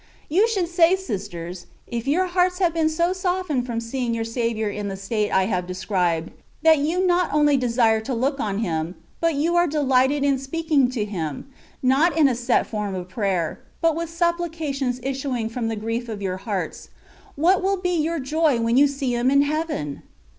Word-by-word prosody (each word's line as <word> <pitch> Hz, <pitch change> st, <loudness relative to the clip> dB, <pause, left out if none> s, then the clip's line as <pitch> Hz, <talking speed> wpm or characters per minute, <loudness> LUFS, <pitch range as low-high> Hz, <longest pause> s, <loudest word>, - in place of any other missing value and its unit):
You 385 Hz, +9 st, +4 dB
should 390 Hz, -6 st, 0 dB
say, 345 Hz, +1 st, +4 dB
sisters, 185 Hz, -, -6 dB, 0.2 s
if 235 Hz, +1 st, -5 dB
your 345 Hz, +7 st, +2 dB
hearts 360 Hz, 0 st, +1 dB
have 355 Hz, -3 st, +2 dB
been 320 Hz, -1 st, +2 dB
so 340 Hz, +3 st, +1 dB
softened 360 Hz, -8 st, -1 dB
from 235 Hz, -2 st, -2 dB
seeing 235 Hz, 0 st, -2 dB
your 225 Hz, -, -1 dB
Saviour 230 Hz, -1 st, -1 dB
in 205 Hz, 0 st, -3 dB
the 195 Hz, -1 st, -4 dB
state 205 Hz, +2 st, -1 dB
I 190 Hz, -, +3 dB
have 180 Hz, -3 st, -1 dB
described, 180 Hz, -3 st, -1 dB, 0.3 s
that 320 Hz, -2 st, +6 dB
you 335 Hz, +6 st, +1 dB
not 360 Hz, -1 st, +2 dB
only 295 Hz, -1 st, +4 dB
desire 230 Hz, -3 st, +2 dB
to 255 Hz, +4 st, -4 dB
look 275 Hz, +4 st, 0 dB
on 200 Hz, -5 st, -1 dB
Him, 165 Hz, +1 st, -2 dB, 0.2 s
but 330 Hz, -2 st, +1 dB
you 325 Hz, +5 st, +1 dB
are 345 Hz, 0 st, +4 dB
delighted 280 Hz, -1 st, +2 dB
in 280 Hz, -2 st, +2 dB
speaking 285 Hz, -1 st, +1 dB
to 240 Hz, -5 st, -2 dB
Him, 165 Hz, -, -4 dB, 0.4 s
not 280 Hz, +7 st, +3 dB
in 305 Hz, -3 st, +6 dB
a 260 Hz, -, +1 dB
set 240 Hz, +1 st, +1 dB
form 210 Hz, -3 st, -3 dB
of 180 Hz, -1 st, -6 dB
prayer, 185 Hz, -5 st, -1 dB, 0.2 s
but 330 Hz, -2 st, +2 dB
with 335 Hz, 0 st, -3 dB
supplications 325 Hz, -7 st, -1 dB
issuing 265 Hz, -4 st, -2 dB
from 230 Hz, 0 st, -3 dB
the 225 Hz, -, -2 dB
grief 230 Hz, +3 st, -3 dB
of 215 Hz, -2 st, -5 dB
your 190 Hz, -2 st, -2 dB
hearts, 195 Hz, -1 st, -4 dB, 0.5 s
what 350 Hz, +6 st, +3 dB
wiU 385 Hz, 0 st, 0 dB
be 360 Hz, -, +1 dB
your 330 Hz, +1 st, 0 dB
joy 295 Hz, -1 st, +1 dB
when 230 Hz, +1 st, +1 dB
you 285 Hz, +1 st, +7 dB
see 275 Hz, -3 st, -2 dB
Him 240 Hz, +2 st, +2 dB
in 280 Hz, +1 st, +5 dB
heaven? 295 Hz, -, -2 dB
265 Hz, 195 wpm, -23 LUFS, 220-325 Hz, 0.5 s, you